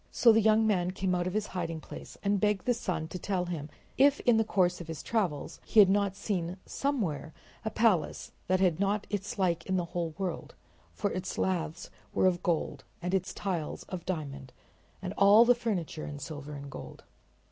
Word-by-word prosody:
So 235 - +6
the 225 0 +5
young 220 +1 +4
man 180 -5 +2
came 185 0 -1
out 175 -1 0
from 185 +2 -3
his 215 -1 +1
hiding 170 -4 -4
place - - -10
and 200 0 +2
begged 210 -3 +1
the 245 - +3
sun 175 -9 -3
to 180 - -5
tell 185 -1 -1
him 160 -4 -5 0.3
if 285 +1 +6
in 240 -2 +4
the 225 - +4
course 180 -5 +1
of 170 - -9
his 160 -2 -6
travels 175 -8 -1
he 220 - +3
had 195 -2 +8
not 200 -1 +1
seen 185 -3 -2
somewhere 195 - -2 0.3
a 220 - -1
palace 215 -9 +1 0.2
that 185 0 +2
had 180 -3 +2
not 200 +1 +1
its 205 +3 -3
like 175 -4 +1
in 190 -1 +1
the 175 - 0
whole 170 -3 -2
world, 190 -2 -4 0.4
for 205 - -2
its 185 0 -4
laths 175 -2 -2 0.2
were - - +3
of 180 -2 +3
gold 170 -3 -1 0.2
and 180 +2 -3
its 185 -1 0
tiles 175 -6 -3
of 180 -3 -5
diamond 140 -7 -4 0.5
and 185 0 -3
all 205 +4 +8
the 245 - +7
furniture 200 -10 -3
in 145 - -6
silver 150 0 -7
and 140 0 -8
gold. - - -9
185 Hz, 200 wpm, -30 LUFS, 170-205 Hz, 0.5 s, had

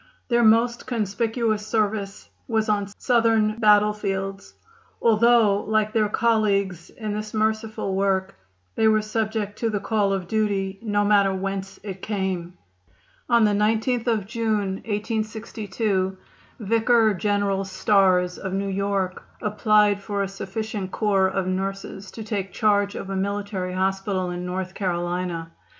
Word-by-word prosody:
Their 240 -1 +3
most 230 +2 +3
conspicuous 225 -1 -1
service 210 -3 -1 0.2
was 220 -2 0
on 205 -1 +1
Southern 225 -3 +2
battlefields, 205 -2 +1 0.4
although, 225 -2 +4
like 215 0 0
their 215 -2 +2
colleagues 200 -6 +1
in 215 -3 -5
this 215 +1 -5
merciful 220 -2 -1
work, 195 0 0 0.4
they 220 - +2
were 215 -1 +3
subject 215 -1 -2
to 230 - 0
the 210 -2 -1
call 205 -1 +1
of 190 -3 -2
duty 200 -2 -1
no 205 -2 0
matter 200 -1 +4
whence 195 0 -4
it 190 -3 -7
came. 190 -4 -3 0.7
On 235 -2 +5
the 210 - +4
19th 220 +4 +1
of 220 -4 +1
June, 215 -3 -1
1862, 215 -2 -2 0.4
Vicar 225 +1 +3
General 200 0 0
Starrs, 190 -2 +2
of 190 -1 -4
New 195 +1 -1
York, 195 -1 -1 0.2
applied 210 -1 +3
for 200 0 -2
a - - -2
sufficient 195 +1 -5
corps 195 -2 +2
of 190 0 -1
nurses 195 +1 -4
to 220 - -8
take 200 -3 -3
charge 205 -2 +2
of 195 - -6
a - - -2
military 200 -1 -2
hospital 190 0 -1
in 180 0 -4
North 185 +1 -4
Carolina. 175 -2 -2
205 Hz, 135 wpm, -24 LUFS, 195-220 Hz, 0.7 s, On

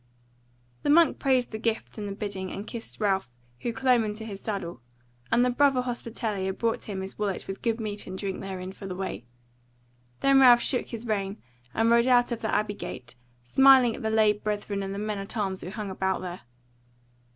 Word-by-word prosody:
The - - -1
monk 330 +2 +5
praised 260 -3 +2
the 220 - -5
gift 225 0 -2
and 205 - -4
the - - -4
bidding, 200 -3 -4
and 200 - -6
kissed 230 +1 -8
Ralph, 195 - +1 0.3
who 240 - -2
clomb 245 0 +3
into 215 +1 -4
his 200 -3 -7
saddle; 185 - -4 0.5
and 240 +1 +4
the 250 - +2
brother 270 0 +3
hospitalier 220 -5 -3
brought 230 -1 -1
him 195 -3 -4
his 190 +2 -7
wallet 200 -3 -2
with 195 - -6
good 230 -1 0
meat 210 -2 -4
and 190 - -6
drink 195 -1 -4
therein 190 -1 -5
for 195 0 -9
the 185 - -5
way. 180 - -5 1.0
Then 275 0 +5
Ralph 245 -2 +8
shook 250 - 0
his 230 0 -7
rein, 200 -2 -1 0.4
and 225 +1 +3
rode 235 +1 +5
out 245 -1 +4
of 235 - -3
the 220 - -1
abbey 210 0 +1
gate, 125 -10 -8 0.3
smiling 260 - +6
at - - -8
the 220 - -1
lay 220 -1 +4
brethren 205 -1 -3
and 195 0 -4
the - - -5
men 210 0 -2
at 195 +4 -6
arms 190 -3 -1
who 180 - -6
hung 210 -1 -5
about 190 0 -1
there. 180 -1 -6
215 Hz, 205 wpm, -27 LUFS, 195-235 Hz, 1.0 s, Ralph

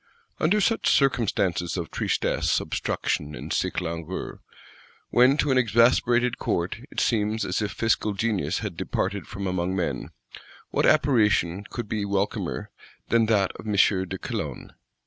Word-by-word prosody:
Under 190 +7 +3
such 225 +3 +2
circumstances 100 - +1
of 85 -3 -4
tristesse, - - 0
obstruction 75 0 -2
and - - -5
sick - - 0
langour, 85 +1 -5 0.7
when 125 +4 +5
to 145 -1 +1
an 130 - +4
exasperated 120 +1 +3
Court 85 +3 -1
it - - -4
seems 110 -1 +1
as - - -1
if 105 -1 -2
fiscal 110 -1 0
genius 95 -6 0
had 95 -5 -4
departed 100 +4 -2
from 100 - -6
among 90 0 -1
men, 90 -3 -2 0.6
what - - +2
apparition 105 - +3
could 120 +1 -6
be 105 -1 -2
welcomer 100 0 -2 0.4
than 115 -1 +3
that 100 -4 +2
of - - -10
M. 105 - -1
de 95 -1 +2
Calonne? - - -5
105 Hz, 145 wpm, -25 LUFS, 95-120 Hz, 0.7 s, when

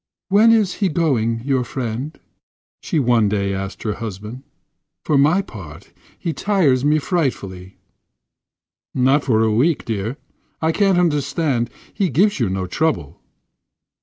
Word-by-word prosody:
"When 210 +4 +6
is 215 -5 +3
he 195 - +3
going—your 130 -5 0
friend?" 125 +4 -5 0.6
she - - -2
one 120 -6 +3
day 100 -1 -1
asked 95 +1 -5
her 105 - -1
husband. 110 +3 -7 0.6
"For 150 - +1
my 155 +8 +4
part, 95 - -11 0.2
he 165 - -3
tires 155 -12 +2
me 150 +1 +3
frightfully." 100 - -3 1.2
"Not 135 +3 +3
for 110 -4 +2
a 110 -1 +2
week 145 +8 +2
yet, - - -23
dear. 110 +3 -3 0.4
I 160 0 +1
can't 195 +1 +2
understand; 145 -6 +1 0.2
he 195 -4 0
gives 195 - +2
you 115 -6 +1
no 95 0 -2
trouble." 90 - -2
130 Hz, 135 wpm, -20 LUFS, 110-160 Hz, 1.2 s, When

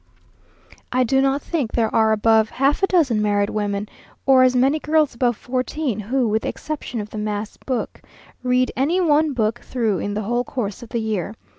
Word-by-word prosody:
I 255 0 +2
do 265 +3 +2
not 275 +1 +1
think 290 -10 -2
there 225 -2 0
are 220 -1 +4
above 220 0 +3
half 275 +5 +1
a 390 - +3
dozen 280 - +2
married 205 -1 +1
women, 205 -1 -2 0.4
or 265 -1 +6
as 255 0 +4
many 270 +5 +3
girls 305 -1 +2
above 240 -1 0
fourteen, 255 -1 -2
who, 240 +4 0
with 220 +1 +1
the - - -3
exception 300 -6 -5
of 210 0 -6
the 215 - -5
mass 210 0 -3
book, 255 -3 -4 0.4
read 255 0 +1
any 305 +8 +1
one 310 -3 +3
book 225 -1 0
through 225 -6 -1
in 205 0 -3
the 215 - -2
whole 240 +4 0
course 230 -4 -4
of 235 - -10
the 235 - -2
year. 215 -2 -3
240 Hz, 195 wpm, -21 LUFS, 215-270 Hz, 0.4 s, or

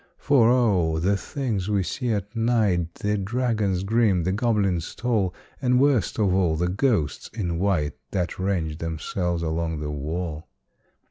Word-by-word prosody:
For 130 -6 +4
O! 100 -10 +3
the 95 +5 +2
things 105 -4 -3
we 100 -2 +1
see 125 +7 -3
at 105 0 -2
night 105 -8 +1
The 105 0 -1
dragons 105 -3 0
grim, 105 -4 +2
the 95 - 0
goblins 100 -6 0
tall, 110 -7 0 0.3
And, 125 -1 +3
worst 130 -9 +2
of 100 -4 +2
all, 90 -4 +2
the 90 +2 0
ghosts 100 - 0
in 90 -6 -2
white 90 -7 +1 0.2
That 90 -2 -2
range 85 -5 -1
themselves 85 +2 -2
along 80 0 -2
the 75 0 -4
wall! 80 +2 -4
95 Hz, 150 wpm, -24 LUFS, 85-110 Hz, 0.3 s, For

